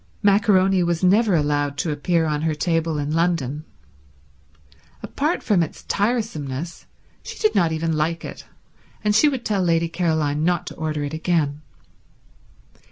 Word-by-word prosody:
Maccaroni 195 -2 +4
was 170 0 0
never 200 +2 +4
allowed 145 -2 0
to 155 +3 -1
appear 160 +3 0
on 150 -1 -1
her 160 -1 0
table 165 -1 0
in 145 0 -2
London. 160 -3 0 1.4
Apart 305 +5 -1
from 200 -5 +2
its 160 - -4
tiresomeness 175 - -2 0.3
she - - -9
did 430 - +2
not 170 -4 +2
even 160 +1 -1
like 160 +2 -1
it, - - -9 0.6
and 210 -1 +2
she 295 +7 +5
would 265 -4 -4
tell 205 -3 0
Lady 170 -1 +2
Caroline 160 -4 0
not 175 0 +1
to - - -7
order 155 -2 -3
it 145 +1 -4
again. 155 -3 0
165 Hz, 150 wpm, -22 LUFS, 150-190 Hz, 1.4 s, she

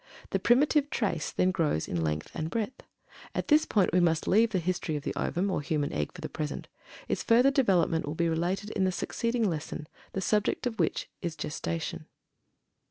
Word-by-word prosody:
The - - +1
"primitive 290 +4 +4
trace" 195 - -1
then 185 - +2
grows 160 - 0
in 85 - -1
length 75 -1 -2
and 160 0 -3
breadth. 230 +6 -3 0.5
At - - -2
this 305 0 +6
point 195 -6 +2
we 180 - +5
must 165 -2 +2
leave 225 +3 +5
the 205 - 0
history 175 -2 -1
of 145 - -3
the - - -2
ovum, 190 +3 -1
or 180 - 0
human 145 -1 -1
egg, 75 -1 -1
for - - -11
the - - -3
present; 150 -2 -4 0.4
its - - -1
further 245 +4 +5
development 185 - +2
will 150 - -3
be 170 +1 +1
related 180 +6 -1
in 195 - 0
the 185 - +2
succeeding 230 +4 -1
lesson, 155 -2 -4 0.3
the - - -1
subject 210 +4 +1
of 225 -3 -2
which - - 0
is 170 -3 -3
"Gestation." 85 - -4
180 Hz, 195 wpm, -29 LUFS, 155-225 Hz, 0.5 s, this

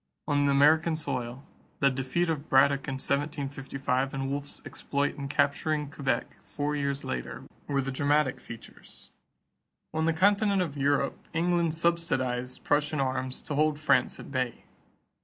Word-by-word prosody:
On 145 -1 +2
American 155 +4 +4
soil, 130 -3 -4 0.3
the 140 0 +4
defeat 135 +7 -1
of 155 -2 -3
Braddock 140 +1 +4
in 135 - -2
1755 135 -1 -2
and 135 0 -2
Wolfe's 145 0 -4
exploit 140 0 -2
in 140 -1 -5
capturing 145 +1 0
Quebec 140 -3 -2
four 145 0 -3
years 140 -1 -1
later 60 -1 -4 0.2
were 140 -1 +1
the 135 0 -3
dramatic 145 0 +1
features. 115 - -13 0.8
On 160 0 0
the 165 - +3
continent 200 +2 +3
of 150 -5 -5
Europe, 140 0 +1 0.2
England 170 -1 +1
subsidized 130 -7 -1
Prussian 150 0 +1
arms 130 -1 -2
to 150 - -4
hold 150 0 +2
France 140 -5 +2
at - - -10
bay. 130 -3 -2
140 Hz, 140 wpm, -28 LUFS, 135-155 Hz, 0.8 s, American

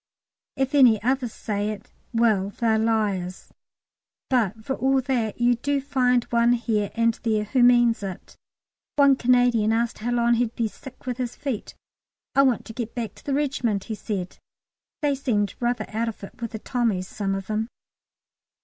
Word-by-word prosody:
If 270 +1 -1
any 250 -7 +6
others 255 -1 0
say 205 -1 -3
it, 215 -1 -7 0.2
"well, 220 -5 +2
they're 220 +1 +1
liars." 205 -5 -1 0.8
But 220 -3 +1
for 270 - -1
all 270 +1 +2
that, 240 -5 -1
you 240 0 +4
do 285 +3 0
find 250 -3 +2
one 235 0 +4
here 220 -4 0
and 230 0 +3
there 215 -2 +1
who 250 +5 +1
means 240 -2 +5
it. 190 -3 -7 0.6
One 280 -2 +6
Canadian 245 -3 +3
asked 230 +1 0
how 230 +3 -3
long 240 0 +3
he'd 235 -1 0
be 230 - 0
sick 260 +4 -13
with 250 -2 -3
his 245 -1 -3
feet. 275 -7 -5 0.6
"I 275 - +5
want 260 -4 +2
to 225 - -9
get 235 0 -5
back 235 -3 -3
to - - -18
the 275 - -1
regiment," 255 -8 0
he 225 - -5
said. 200 -4 -5 0.6
They 290 -1 +3
seem 240 -7 0
rather 240 -2 0
out 225 +2 -1
of 215 - -10
it 195 - -11
with 230 -1 -4
the - - -3
Tommies, 220 -7 -1
some 195 -1 -2
of 195 -1 -5
them. 215 +2 -2
235 Hz, 175 wpm, -24 LUFS, 215-250 Hz, 0.8 s, any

